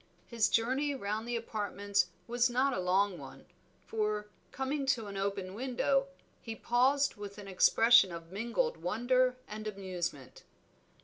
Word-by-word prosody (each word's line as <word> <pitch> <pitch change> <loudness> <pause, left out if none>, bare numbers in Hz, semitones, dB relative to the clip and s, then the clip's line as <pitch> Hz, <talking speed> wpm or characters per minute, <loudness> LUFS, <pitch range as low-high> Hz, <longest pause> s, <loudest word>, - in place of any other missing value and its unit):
His 225 -3 +1
journey 265 +7 +1
round 215 -1 -3
the 240 - -2
apartments 205 -4 -1 0.2
was 240 +1 +2
not 260 +3 +2
a - - -2
long 185 +1 +1
one, - - -11 0.4
for, 210 -1 -1 0.3
coming 270 +1 -2
to 245 -5 +1
an 200 -1 -7
open 195 -1 -3
window, 270 +4 0 0.3
he 225 -1 -6
paused 265 +4 +2
with 205 0 -8
an 205 -1 -9
expression 225 +2 +5
of 165 0 -8
mingled 240 - -1
wonder 250 +6 +1
and 215 +1 -6
amusement. 180 -9 -5
220 Hz, 140 wpm, -32 LUFS, 200-255 Hz, 0.4 s, expression